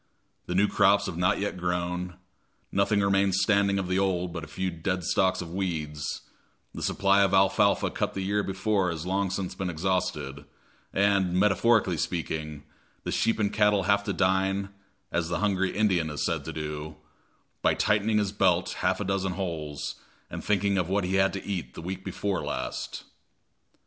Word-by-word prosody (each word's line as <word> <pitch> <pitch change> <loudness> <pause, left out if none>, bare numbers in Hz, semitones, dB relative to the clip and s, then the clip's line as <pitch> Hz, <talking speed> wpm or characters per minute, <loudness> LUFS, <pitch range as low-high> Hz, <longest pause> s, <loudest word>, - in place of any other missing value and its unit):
The 90 - -2
new 100 +3 +4
crops 100 0 +4
have 95 -4 -4
not 90 +3 +2
yet 100 -1 -2
grown, 90 0 -2 0.6
nothing 100 +1 +2
remains 100 -1 +2
standing 100 0 +3
of 95 -2 -2
the 90 +1 +1
old 90 -3 0
but 85 -2 -5
a - - -7
few 95 +4 -3
dead 90 +2 -2
stalks 95 +2 +2
of 85 0 -9
weeds, 75 -6 -3 0.5
the - - -7
supply 100 0 +3
of 100 -1 +3
alfalfa 95 +1 +3
cut - - -2
the 95 - -2
year 100 +2 +1
before 95 -1 0
has 85 -1 -4
long 95 +1 0
since 90 0 -3
been 95 -1 -3
exhausted, 85 -5 -2 0.5
and, 100 -2 +2
metaphorically 105 -1 +3
speaking, 75 -3 -3 0.4
the - - -3
sheep 115 - +1
and 105 -2 0
cattle 105 -2 +3
have 100 +1 +2
to - - -1
dine, 95 +1 +1 0.4
as 85 -1 -1
the 85 - 0
hungry 95 -1 0
Indian 95 -7 +2
is 75 - -2
said - - -1
to - - -4
do, 75 0 -5 0.7
by - - +3
tightening 105 +1 +2
his 105 -2 +1
belt 95 -3 +1
half 90 +1 +1
a - - -1
dozen 95 -1 -1
holes 80 -6 -4 0.3
and - - -5
thinking 100 -1 +1
of 90 -1 -1
what 100 +1 +1
he 95 +2 0
had 95 0 +4
to 100 - -5
eat 90 -11 -4
week 95 +3 -5
before 100 -2 -2
last. - - -4
95 Hz, 175 wpm, -27 LUFS, 90-100 Hz, 0.7 s, new